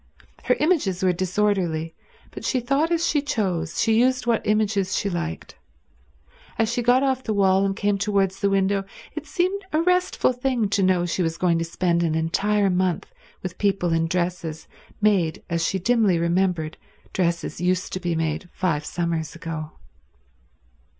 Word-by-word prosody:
Her 250 - +3
images 280 - +1
were 185 -1 +3
disorderly, 180 -3 0 0.4
but - - -9
she 260 - +1
thought 275 +6 +1
as 335 0 +2
she 295 -3 +2
chose, 180 - -2
she 225 -1 +3
used 255 +1 +2
what 235 -2 +2
images 205 -3 +1
she 200 - -1
like. 80 - -5 1.0
As 225 +1 +1
she 245 - 0
got 245 +3 +4
off 265 -1 +1
the 215 -3 -2
wall 195 -1 +4
and 195 - -2
came 205 -1 0
towards 195 -2 0
the 200 - +2
window, 195 0 +1 0.3
it 310 0 -6
seemed 365 +5 0
a 310 - +2
restful 360 -6 +2
thing 250 -4 0
to 200 0 +1
know 185 -2 +3
she 175 +2 -1
was 165 -1 -1
going 170 -2 +2
to - - 0
spend 170 +1 0
an 165 -2 +1
entire 195 +5 +1
month 180 -1 -1 0.3
with 185 -1 -6
people 195 -4 +1
in 165 0 +1
dresses 175 -2 -2 0.3
made 190 -7 +2
as 170 -1 0
she 190 - 0
dimly 210 -2 +2
remembered 170 -2 0 0.4
dresses 170 -2 -1
used 180 +1 0
to 185 - -2
be 175 -2 -1
made 160 +2 -2
five 155 -5 0
summers 165 -1 -3
ago. 160 -1 -6
190 Hz, 170 wpm, -24 LUFS, 170-220 Hz, 1.0 s, got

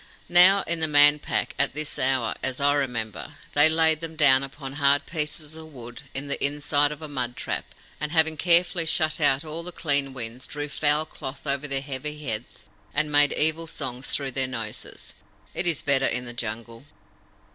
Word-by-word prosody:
"Now, 185 +3 +7
in 170 0 0
the 160 - 0
Man 145 0 +6
Pack, - - -2
at - - 0
this 155 0 -4
hour, 130 -3 +1
as 130 -1 -3
I 145 0 +3
remember, 115 - -3 0.2
they 145 +2 +7
laid 160 -1 +2
them 165 -1 -7
down 140 -4 +5
upon 135 0 -7
hard 140 0 +2
pieces 155 -1 -3
of 160 0 -12
wood 120 -2 -10
in 135 +2 -4
the 140 - -3
inside 145 0 +1
of 150 +1 -8
a - - -6
mud 125 -4 -4
trap, - - -3 0.3
and, 150 +1 -3
having 160 -1 +2
carefully 170 +1 +2
shut 155 0 +1
out 145 +1 +2
all 155 +2 -5
the 180 +1 -7
clean 145 -5 -1
winds, 120 0 -7
drew 145 0 -5
foul 150 +2 +1
cloth 140 -2 -9
over 140 +1 -2
their 135 -1 -2
heavy 140 +2 -6
heads 110 -1 -5 0.3
and 155 +1 +1
made 145 0 +4
evil 160 +2 +2
songs 130 -4 -5
through 135 -2 -2
their 130 0 -1
noses. 115 -4 -8 0.4
It 175 - 0
is 165 -4 +3
better 135 -1 +2
in 125 0 -2
the 120 - -8
Jungle." 115 0 -6
145 Hz, 190 wpm, -24 LUFS, 130-155 Hz, 0.4 s, Now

